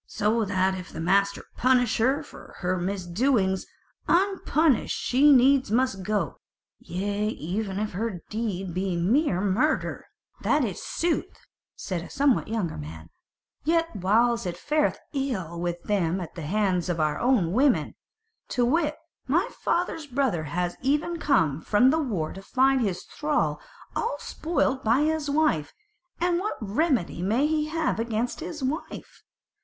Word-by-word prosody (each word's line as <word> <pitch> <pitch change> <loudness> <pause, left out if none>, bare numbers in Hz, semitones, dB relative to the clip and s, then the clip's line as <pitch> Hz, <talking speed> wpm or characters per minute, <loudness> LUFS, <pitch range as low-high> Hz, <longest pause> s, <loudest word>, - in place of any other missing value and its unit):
So 220 +2 +1
that 190 -1 +1
if 185 -2 -7
the - - -7
master 200 +4 +1
punish 245 -3 +3
her 260 +5 +4
not 300 +1 -7
for - - -13
her 180 0 +1
misdoings, 190 +2 0 0.4
unpunished 335 - +2
she 280 +4 +4
needs 265 -1 +5
must 230 -3 +1
go; 210 +2 -2 0.4
yea 205 +3 -2
even 195 +1 -3
if 215 +1 -2
her 195 -2 -3
deed 195 -5 -3
be 185 0 -1
mere 200 - +2
murder." 210 +11 0 0.3
"That 295 -3 +2
is 195 -6 -5
sooth," 335 -1 -2 0.3
said 185 -4 -4
a 170 - -9
somewhat 275 -2 +2
younger 215 -7 -2
man; 80 +2 -9 0.5
"yet 330 -2 +1
whiles 225 +3 +2
it 175 -1 -4
fareth 300 +9 +1 0.2
ill 205 - -3
with 175 0 -3
them 190 -3 0
at 175 -4 -7
the 170 - -7
hands 190 -4 +1
of 170 -2 -1
our 155 -1 +1 0.3
women. 255 - +2 0.5
To 245 - +1
wit, 300 +3 +1 0.3
my 315 +7 +2
father's 335 -3 -1
brother 250 - 0
has 175 +4 -2
even 295 +6 +1
now 335 - -5
come 160 - +2
from 235 +9 +4
the 320 - +1
war 200 - -2
to 195 - -9
find 265 +5 +2
his 190 -5 -1
thrall 300 -1 -1 0.3
all 460 +2 -1
spoilt 280 -5 -1
by 230 +5 +3
his 310 -1 0
wife: 280 - +1 0.5
and 350 0 +1
what 420 +3 -3
remedy 220 - 0
may 225 +10 +2
he 305 0 +1
have 320 -5 -1
against 230 +1 -2
his 305 -4 -6
wife? 295 +6 -5
225 Hz, 150 wpm, -26 LUFS, 185-285 Hz, 0.5 s, needs